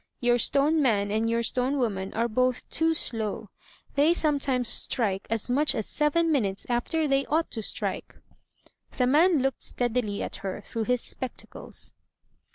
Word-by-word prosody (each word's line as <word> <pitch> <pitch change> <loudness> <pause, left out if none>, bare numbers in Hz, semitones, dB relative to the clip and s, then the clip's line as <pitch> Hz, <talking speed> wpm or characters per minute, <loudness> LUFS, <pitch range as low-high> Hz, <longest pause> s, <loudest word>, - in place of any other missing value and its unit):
Your 240 0 +2
stone 295 +5 +2
man 205 -6 +1
and 220 +2 0
your 230 0 0
stone 255 +4 0
woman 195 -7 -2
are 230 +2 +1
both 255 +2 0
too 325 +1 +1
slow; 220 -6 -1 0.4
they 300 +4 +4
sometimes 275 -6 +1
strike 210 -3 0
as 225 -1 0
much 285 +5 +2
as 220 - -1
seven 320 +3 +1
minutes 200 -9 0
after 300 +6 0
they 275 0 +2
ought 320 +3 0
to 225 - -3
strike." - - -4 0.8
The 250 - +3
man 305 +2 +4
looked 270 -1 -1
steadily 240 -4 -1
at - - -5
her 195 +1 -5
through 225 +2 -4
his 250 0 +1
spectacles. 260 - -6
250 Hz, 160 wpm, -26 LUFS, 220-285 Hz, 0.8 s, they